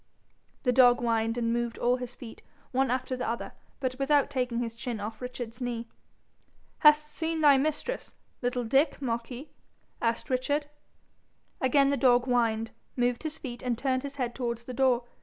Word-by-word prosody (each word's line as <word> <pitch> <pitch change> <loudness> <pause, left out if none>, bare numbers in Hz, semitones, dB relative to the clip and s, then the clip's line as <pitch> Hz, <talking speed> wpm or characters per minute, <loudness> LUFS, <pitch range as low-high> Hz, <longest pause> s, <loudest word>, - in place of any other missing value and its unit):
The 250 - +3
dog 245 -1 +6
whined, 230 -1 0
and 230 -1 +1
moved 235 -1 -2
all 245 +1 +2
his 250 -1 -7
feet, 230 -3 -10 0.3
one 265 0 +2
after 255 +1 -1
the 250 - -2
other, 235 - -4 0.3
but 260 -1 -3
without 285 +1 +3
taking 250 -3 -1
his 235 -1 -2
chin 235 -1 -4
off 215 +2 -6
Richard's 245 -1 -6
knee. 240 -1 -3 0.9
'Hast 300 0 +6
seen 325 -1 -2
thy 285 -3 +7
mistress, 310 - -2 0.3
little 245 0 -1
Dick, 270 +7 +2
Marquis?' 245 +2 -4 0.5
asked 230 +2 -1
Richard. 285 +4 +1 1.0
Again 275 +1 +4
the 280 - +1
dog 245 -2 +4
whined, 225 -3 +1 0.2
moved 245 -1 +1
his 315 -1 -4
feet, 240 -3 -7
and 245 -2 -1
turned 260 0 0
his 280 0 -7
head 250 -4 -2
towards 235 -2 -3
the 250 - -7
door. 255 -1 +3
250 Hz, 170 wpm, -29 LUFS, 235-270 Hz, 1.0 s, thy